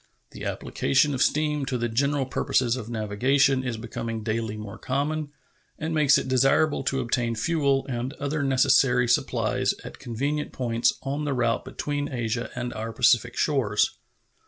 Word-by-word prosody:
The -, -, -8 dB
application 140 Hz, +2 st, +1 dB
of 130 Hz, -, -2 dB
steam 150 Hz, -1 st, +1 dB
to 130 Hz, -, -1 dB
the 120 Hz, 0 st, -1 dB
general 140 Hz, +4 st, 0 dB
purposes 125 Hz, -1 st, +1 dB
of 115 Hz, -3 st, -6 dB
navigation 130 Hz, +5 st, +2 dB
is 125 Hz, -3 st, -3 dB
becoming 115 Hz, -1 st, -5 dB
daily 110 Hz, -1 st, -2 dB
more 105 Hz, -2 st, -8 dB
common, 145 Hz, +3 st, -2 dB, 0.5 s
and 160 Hz, +1 st, -3 dB
makes 150 Hz, -3 st, +5 dB
it -, -, -3 dB
desirable 135 Hz, +4 st, +3 dB
to 135 Hz, +1 st, 0 dB
obtain 120 Hz, -1 st, -1 dB
fuel 140 Hz, +1 st, +1 dB
and 125 Hz, +1 st, -3 dB
other 145 Hz, +1 st, -3 dB
necessary 130 Hz, -2 st, +3 dB
supplies -, -, +1 dB
at -, -, -10 dB
convenient 140 Hz, +6 st, -3 dB
points 120 Hz, -2 st, +1 dB
on 140 Hz, +2 st, -2 dB
the 140 Hz, -2 st, -1 dB
route 120 Hz, -2 st, +1 dB
between 145 Hz, 0 st, -3 dB
Asia 120 Hz, -1 st, -2 dB
and 125 Hz, -1 st, -4 dB
our 110 Hz, +1 st, -4 dB
Pacific 120 Hz, +1 st, +3 dB
shores. 120 Hz, -9 st, +1 dB
130 Hz, 155 wpm, -25 LUFS, 115-140 Hz, 0.5 s, makes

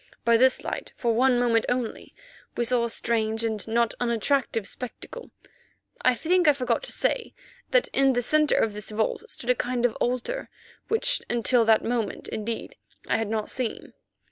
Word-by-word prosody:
By 235 Hz, 0 st, +5 dB
this 260 Hz, +3 st, +4 dB
light, -, -, -5 dB
for 235 Hz, -2 st, 0 dB
one 250 Hz, +2 st, +3 dB
moment 235 Hz, -2 st, +2 dB
only, 245 Hz, -2 st, -3 dB, 0.4 s
we 240 Hz, -, +1 dB
saw 245 Hz, 0 st, +2 dB
a -, -, -3 dB
strange, 225 Hz, -1 st, 0 dB
and 220 Hz, -2 st, -2 dB
not 230 Hz, 0 st, +1 dB
unattractive 235 Hz, -2 st, 0 dB
spectacle. 450 Hz, -, -8 dB, 0.7 s
I 255 Hz, -1 st, +3 dB
think 350 Hz, +5 st, +2 dB
I 295 Hz, -, +7 dB
forgot 260 Hz, -, -1 dB
to -, -, -5 dB
say 485 Hz, -2 st, -1 dB, 0.3 s
that -, -, +3 dB
in 270 Hz, -1 st, +3 dB
the 245 Hz, 0 st, 0 dB
centre 305 Hz, +4 st, +3 dB
of 220 Hz, -, +1 dB
this 210 Hz, 0 st, -7 dB
vault 215 Hz, 0 st, -1 dB
stood 245 Hz, -, -1 dB
a -, -, +5 dB
kind 245 Hz, 0 st, -1 dB
of 240 Hz, -, +1 dB
altar, 255 Hz, -, -2 dB, 0.4 s
which -, -, +2 dB
until 240 Hz, 0 st, +3 dB
that 220 Hz, 0 st, +4 dB
moment, 230 Hz, -3 st, -2 dB
indeed, 230 Hz, -, -5 dB, 0.3 s
I -, -, +2 dB
had 225 Hz, -, -2 dB
not 215 Hz, -1 st, -2 dB
seen. 250 Hz, -4 st, -4 dB
240 Hz, 175 wpm, -26 LUFS, 225-260 Hz, 0.7 s, I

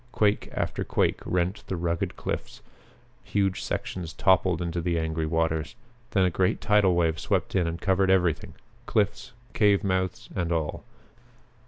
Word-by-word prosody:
Quake 105 Hz, -3 st, +1 dB
after -, -, -2 dB
quake -, -, +1 dB
rent 90 Hz, +3 st, -1 dB
the 95 Hz, -, -2 dB
rugged 85 Hz, -1 st, -2 dB
cliffs: -, -, -5 dB, 0.6 s
huge 95 Hz, -2 st, 0 dB
sections 85 Hz, -3 st, -4 dB
toppled 95 Hz, -2 st, +3 dB
into 85 Hz, -1 st, -2 dB
the 85 Hz, 0 st, 0 dB
angry 80 Hz, -1 st, -1 dB
waters. 80 Hz, +1 st, 0 dB, 0.3 s
Then 95 Hz, -2 st, +3 dB
a 90 Hz, -, +1 dB
great 90 Hz, +2 st, +1 dB
tidal 105 Hz, -4 st, +3 dB
wave 80 Hz, -2 st, +1 dB
swept -, -, -1 dB
in 90 Hz, -3 st, +2 dB
and 85 Hz, +1 st, -3 dB
covered 95 Hz, -1 st, +2 dB
everything, 90 Hz, -4 st, +1 dB, 0.3 s
cliffs, 105 Hz, -2 st, 0 dB, 0.2 s
cave 105 Hz, -1 st, +3 dB
mouths 95 Hz, -2 st, -1 dB
and 85 Hz, -2 st, -1 dB
all. 80 Hz, -3 st, -2 dB
90 Hz, 150 wpm, -27 LUFS, 85-95 Hz, 0.6 s, toppled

